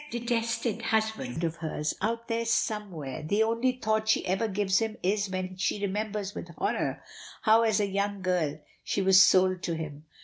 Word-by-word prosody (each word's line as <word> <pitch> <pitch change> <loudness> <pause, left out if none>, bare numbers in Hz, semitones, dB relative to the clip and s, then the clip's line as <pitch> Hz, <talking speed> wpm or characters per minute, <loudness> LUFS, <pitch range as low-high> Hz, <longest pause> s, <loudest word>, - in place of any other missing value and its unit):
That 240 - -3
detested 230 -1 -1
husband 220 - -1
of 165 0 -1
hers, 155 -2 -2
out 230 +1 -1
there 230 0 -1
somewhere, 200 - -2
the 205 +8 +2
only 230 +3 +1
thought 220 -3 -1
she - - +3
ever 190 +5 0
gives 195 -1 +1
him 220 -1 -2
is 200 +2 +1
when 185 0 -4
she 195 - 0
remembers 205 0 -3
with - - -7
horror - - -2 0.4
how 220 0 +6
as 220 -3 +2
a 205 - +2
young 200 0 -2
girl 170 -5 0 0.3
she 195 - -1
was 190 0 +7
sold 185 -1 +5
to 170 - -2
him. 155 -2 -7
200 Hz, 180 wpm, -28 LUFS, 185-220 Hz, 0.4 s, was